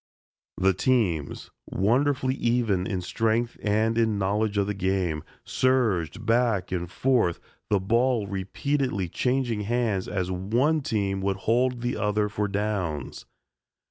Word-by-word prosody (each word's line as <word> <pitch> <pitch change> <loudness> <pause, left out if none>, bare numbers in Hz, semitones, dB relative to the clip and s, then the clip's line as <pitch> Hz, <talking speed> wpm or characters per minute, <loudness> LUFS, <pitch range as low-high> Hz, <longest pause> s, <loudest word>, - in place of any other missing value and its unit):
The 95 +1 +3
teams, 95 - 0 0.2
wonderfully 130 +5 +1
even 115 -7 0
in 95 -3 -2
strength 115 +5 0
and 110 +2 +1
in 110 -2 +2
knowledge 100 +2 0
of 100 - +2
the 105 - -2
game, 95 -5 -1 0.2
surged 115 -6 +1
back 115 -5 +1
and 90 -2 -2
forth, 110 -3 +1 0.3
the 105 - +3
ball 115 +3 +1
repeatedly 100 - -2
changing 125 0 0
hands 110 -3 0
as 95 -2 -2
one 120 - +1
team 100 -6 -1
would 95 0 0
hold 125 +2 +2
the 120 +1 -2
other 105 0 0
for 105 0 -1
downs. 95 - -3
105 Hz, 130 wpm, -26 LUFS, 95-120 Hz, 0.3 s, The